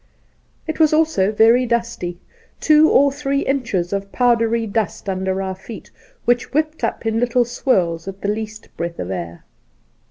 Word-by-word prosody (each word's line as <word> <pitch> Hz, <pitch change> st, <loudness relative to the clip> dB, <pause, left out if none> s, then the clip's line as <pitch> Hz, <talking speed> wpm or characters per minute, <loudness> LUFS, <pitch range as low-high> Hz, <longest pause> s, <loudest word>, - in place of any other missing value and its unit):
It 315 Hz, 0 st, -4 dB
was 310 Hz, -1 st, +4 dB
also 310 Hz, -12 st, +2 dB
very 230 Hz, +4 st, +4 dB
dusty 235 Hz, -7 st, -2 dB, 0.2 s
— 460 Hz, -, -34 dB
two 310 Hz, 0 st, +5 dB
or 280 Hz, 0 st, +4 dB
three 280 Hz, 0 st, -1 dB
inches 230 Hz, -10 st, -1 dB
of 200 Hz, 0 st, -3 dB
powdery 230 Hz, -2 st, +2 dB
dust 215 Hz, -1 st, -3 dB
under 190 Hz, 0 st, -1 dB
our 190 Hz, 0 st, -3 dB
feet, 195 Hz, +4 st, -11 dB, 0.3 s
which 240 Hz, +1 st, +1 dB
whipped 310 Hz, -2 st, -1 dB
up 230 Hz, -, -2 dB
in 225 Hz, 0 st, 0 dB
little 245 Hz, 0 st, +2 dB
swirls 185 Hz, -9 st, 0 dB
at 195 Hz, 0 st, -7 dB
the -, -, -2 dB
least 215 Hz, +1 st, -5 dB
breath 170 Hz, 0 st, -4 dB
of 90 Hz, -, -5 dB
air. 85 Hz, -2 st, -6 dB
225 Hz, 165 wpm, -20 LUFS, 190-255 Hz, 0.3 s, two